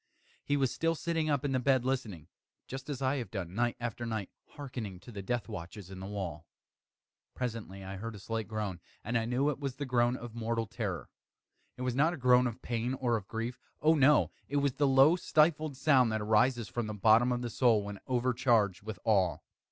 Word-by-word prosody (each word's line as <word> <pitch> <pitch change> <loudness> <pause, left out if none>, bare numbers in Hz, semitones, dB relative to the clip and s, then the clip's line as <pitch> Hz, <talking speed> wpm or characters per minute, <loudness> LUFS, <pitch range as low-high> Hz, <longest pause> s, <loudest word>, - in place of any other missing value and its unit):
He 145 - +1
was 135 -3 +1
still 165 0 +1
sitting 165 -1 -1
up 145 -2 +1
in 140 - 0
the 130 - +2
bed 130 -1 +2
listening; 110 - -2 0.4
just 135 +2 -7
as 135 -2 -3
I 130 +2 +1
have 120 -7 -4
done, 95 -4 -5
night 120 +3 0
after 120 -1 -4
night, 110 -4 -3 0.2
hearkening 120 -10 -6
to 120 - -12
the 100 -3 -6
death 115 0 -2
watches 90 +2 -8
in 95 - -8
the 95 - -6
wall. 85 -6 -5 0.9
Presently 110 -6 -4
I 95 +1 -6
heard 115 +3 -6
a - - -9
slight 110 +2 -3
groan, 105 -5 -3 0.2
and 120 +4 -3
I 115 -1 +2
knew 130 +5 +1
it 140 - -6
was 140 -3 -3
the 145 - -4
groan 120 -1 +2
of 120 -1 -8
mortal 115 0 -1
terror. 100 - -4 0.7
It 125 - -5
was 125 -1 0
not 155 +7 +2
a - - -10
groan 125 -1 +5
of 120 +1 -7
pain 120 +2 -1
or 125 -3 0
of 100 -3 -4
grief 115 +2 -4 0.2
oh, 155 +2 +5
no! 150 -1 +4 0.2
it 145 - 0
was 140 -2 +2
the 145 +1 +2
low 135 +5 +6
stifled 155 -4 +2
sound 130 -5 +4
that 110 0 -1
arises 110 +2 +2
from 120 -2 -3
the 105 - -4
bottom 110 +4 +5
of 120 0 -1
the 120 - -3
soul 115 -5 +3
when 100 -1 -7
overcharged 120 -6 +2
with 110 -1 -6
awe. 95 -6 +3
120 Hz, 215 wpm, -31 LUFS, 105-130 Hz, 0.9 s, low